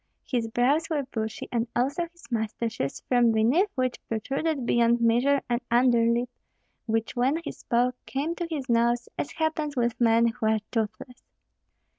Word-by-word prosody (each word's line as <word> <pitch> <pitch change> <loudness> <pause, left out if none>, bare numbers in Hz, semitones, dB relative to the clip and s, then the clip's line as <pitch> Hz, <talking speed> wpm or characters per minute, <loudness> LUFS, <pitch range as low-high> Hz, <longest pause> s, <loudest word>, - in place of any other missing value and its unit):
His 240 -3 -1
brows 250 +8 +1
were 300 -3 0
bushy, 220 -4 -5
and 235 -1 0
also 280 +8 0
his 345 0 -22
mustaches, 220 - -2
from 245 -2 +4
beneath 245 - +3
which 255 -1 -1
protruded 270 +5 -2
beyond 235 0 +3
measure 245 +5 +3
an 240 0 0
underlip, 235 0 +3 0.6
which 225 0 -1
when 260 +5 +2
he - - -4
spoke 245 +1 0
came 290 +5 -2
to 345 0 -4
his 290 -5 -4
nose, 235 0 +2
as - - -3
happens 315 -2 -1
with 240 -1 -1
men 230 0 +5
who 225 -1 -2
are 220 0 +3
toothless. 245 +3 -3
245 Hz, 155 wpm, -26 LUFS, 230-275 Hz, 0.6 s, men